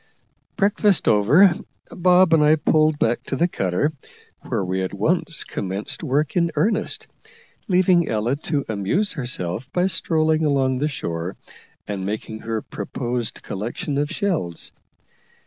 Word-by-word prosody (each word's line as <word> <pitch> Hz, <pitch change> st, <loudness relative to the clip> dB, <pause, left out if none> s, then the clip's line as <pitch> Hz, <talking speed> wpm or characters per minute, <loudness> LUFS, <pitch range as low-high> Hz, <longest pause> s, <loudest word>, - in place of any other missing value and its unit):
Breakfast 205 Hz, -1 st, +2 dB
over, 145 Hz, -, +6 dB, 0.4 s
Bob 180 Hz, -1 st, +4 dB
and 155 Hz, -2 st, +5 dB
I 150 Hz, +1 st, +6 dB
pulled 155 Hz, 0 st, +2 dB
back 120 Hz, -4 st, +1 dB
to -, -, -3 dB
the 170 Hz, +6 st, +2 dB
cutter, 100 Hz, -, -1 dB, 0.5 s
where 95 Hz, -, -2 dB
we 95 Hz, +1 st, -1 dB
at 95 Hz, +1 st, -3 dB
once 165 Hz, -, 0 dB
commenced 100 Hz, +2 st, -3 dB
work 150 Hz, 0 st, 0 dB
in 170 Hz, -2 st, +2 dB
earnest, 215 Hz, 0 st, 0 dB, 0.6 s
leaving 180 Hz, -3 st, +3 dB
Ella 110 Hz, +4 st, 0 dB
to 145 Hz, -2 st, -2 dB
amuse 110 Hz, -, 0 dB
herself 120 Hz, -, -3 dB
by 180 Hz, 0 st, +1 dB
strolling 160 Hz, -3 st, +1 dB
along 135 Hz, -3 st, +1 dB
the 150 Hz, -, +1 dB
shore 85 Hz, -, -4 dB, 0.5 s
and 100 Hz, -2 st, -4 dB
making 110 Hz, +2 st, -4 dB
her 110 Hz, -1 st, -3 dB
proposed 120 Hz, +3 st, -4 dB
collection 120 Hz, +8 st, -3 dB
of 145 Hz, 0 st, 0 dB
shells. 165 Hz, -, -2 dB
140 Hz, 135 wpm, -22 LUFS, 105-170 Hz, 0.6 s, over